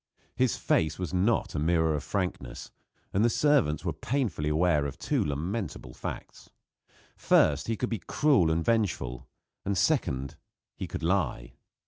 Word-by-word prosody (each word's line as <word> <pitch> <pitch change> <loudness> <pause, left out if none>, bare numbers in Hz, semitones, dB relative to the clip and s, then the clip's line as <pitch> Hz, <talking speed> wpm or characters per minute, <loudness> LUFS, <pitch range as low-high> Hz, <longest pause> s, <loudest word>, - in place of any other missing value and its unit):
His 125 -4 +1
face 80 - +1
was 90 -1 -4
not 100 +6 +1
a 75 - -1
mirror 80 0 +2
of 75 - -2
frankness; 95 -3 -4 0.4
and 100 - +3
the 120 - +5
servants 125 - +2
were 85 - 0
painfully 95 - -1
aware 75 -2 +2
of 70 - -7
two - - 0
lamentable 75 - -4
facts: - - -7 0.7
First, 75 -1 +3
he 115 - 0
could 125 - -2
be 115 - -2
cruel 135 - +2
and 80 +1 0
vengeful; 95 - 0 0.4
and 100 -1 -1
second, 65 -5 0 0.4
he - - -5
could - - -6
lie. 75 -9 0
85 Hz, 150 wpm, -28 LUFS, 75-110 Hz, 0.7 s, the